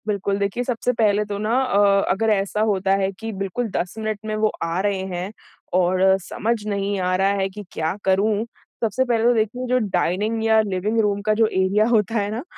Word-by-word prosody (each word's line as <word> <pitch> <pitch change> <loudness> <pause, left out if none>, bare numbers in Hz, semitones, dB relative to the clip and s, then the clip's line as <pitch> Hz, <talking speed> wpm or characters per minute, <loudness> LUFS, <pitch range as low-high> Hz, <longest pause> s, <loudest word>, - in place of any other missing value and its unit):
बिल्कुल, 200 -1 -1
देखिए 200 +5 -1
सबसे 245 0 -1
पहले 210 -1 +3
तो 205 -1 -4
ना 215 +1 -3
अ, 200 -5 +3
अगर 225 +3 +1
ऐसा 200 +1 -1
होता 195 -1 +1
है 190 0 0
कि 225 0 -5
बिल्कुल 195 +5 -2
10 180 - -2
मिनट 215 -1 -3
में 215 0 -2
वो 215 0 +2 0.2
आ 165 +2 -1
रहे 200 -1 0
हैं 180 +1 -4 0.5
और 185 +1 +1 0.2
समझ 225 +6 -2
नहीं 200 -1 -1
आ 185 0 0
रहा 195 +1 +2
है 190 - +1
कि 210 +2 -9
क्या 160 +3 -2
करूँ? 205 +3 +2 0.4
सबसे 230 +4 +1
पहले 235 -3 +1
तो 240 +1 +5
देखिए 225 +3 -1
जो 250 +1 +2
डाइनिंग 205 +5 0
या 220 0 +4
लिविंग 205 +2 -1
रूम 205 -1 0
का 215 +1 +1
जो 225 +1 +3
एरिया 195 +2 +2
होता 225 -1 +1
है 200 0 -1
ना, 230 +4 -4
205 Hz, 210 wpm, -22 LUFS, 195-220 Hz, 0.5 s, तो